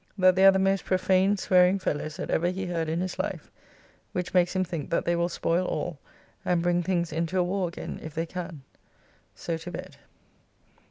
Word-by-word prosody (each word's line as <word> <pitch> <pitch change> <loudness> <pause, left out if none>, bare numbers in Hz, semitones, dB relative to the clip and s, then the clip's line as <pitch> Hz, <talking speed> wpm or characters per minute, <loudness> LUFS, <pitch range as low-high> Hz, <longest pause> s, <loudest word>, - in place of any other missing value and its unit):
That 185 -1 +5
they 190 +1 +7
are - - +10
the 190 - +1
most 195 0 +2
prophane 185 +2 +2
swearing 185 0 +4
fellows 155 -4 -3
that 185 - -4
ever 170 - +2
he 190 +1 -3
heard 165 -3 -2
in 165 +2 -1
his 185 -1 -4
life, - - -4 0.6
which 180 0 -3
makes 180 0 +3
him 185 - +2
think 165 -5 -5
that 170 - 0
they 175 - +2
will 170 +1 +1
spoil 175 +1 0
all, 170 -5 -3 0.4
and 175 -1 +1
bring 175 0 +2
things 175 -2 -1
into 165 +3 -1
a 180 - +4
warr 185 +1 -1
again 170 - -7
if 155 -1 -8
they 165 +1 -1
can. 170 -4 -7 0.7
So 165 - -3
to 165 +2 -8
bed. - - -8
180 Hz, 205 wpm, -27 LUFS, 170-185 Hz, 0.7 s, are